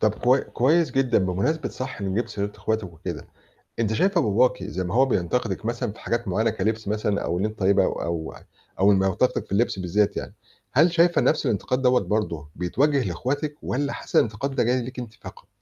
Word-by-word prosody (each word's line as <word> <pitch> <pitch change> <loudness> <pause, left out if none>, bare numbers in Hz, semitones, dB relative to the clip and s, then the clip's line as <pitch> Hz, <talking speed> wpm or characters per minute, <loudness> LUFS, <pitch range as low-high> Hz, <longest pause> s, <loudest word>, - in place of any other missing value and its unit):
طَب 110 -1 +2
كوي 130 +2 +3
كويس 155 +4 +2
جدًا 130 -1 +2
بمناسبة 100 - 0
صح 130 -4 -6
إنِّك 95 -1 -2
جبتِ 120 - -1
سيرة 100 0 -3
إخواتِك 110 -1 -1
وكده، 80 - -7 0.5
أنتِ 110 -1 +1
شايفة 180 - +2
باباكِ 110 0 +2
زي 95 -1 -3
ما 90 +3 -3
هو 130 +2 +5
بينتقدِك 110 -2 -1
مثلًا 115 -2 -2
في 105 - -15
حاجات 120 -1 -2
معيّنة 110 +5 +1
كلِبس 110 +1 -2
مثلًا 105 -1 0
أو 85 +1 -1
إن 100 - +1
أنتِ 110 0 -5
طيّبة 100 0 +4
أو - - -1
أو 85 -1 -3 0.4
أو 100 +2 +5
ال 100 - +4
ما 95 - +2
ينتقدِك 95 +7 0
في - - -25
اللِبس 100 0 +1
بالذّات 100 +3 +1
يعني، - - -5 0.4
هل 160 +6 +4
شايفة 170 +1 +4
نَفْس 155 - +2
الانتقاد 125 +2 0
دَوّة 125 -1 +4
برضه 85 -9 -2
بيتوجّه 135 - +1
لإخواتِك 140 - -2
والّا 140 +2 -2
حاسّة - - -3
الإنتقاد 120 +5 -2
ده 125 - +2
جاي 125 +2 +1
ليكِ 125 +2 -7
أنتِ 120 -3 -7
فقط؟ 110 - -12
110 Hz, 210 wpm, -24 LUFS, 100-130 Hz, 0.5 s, هو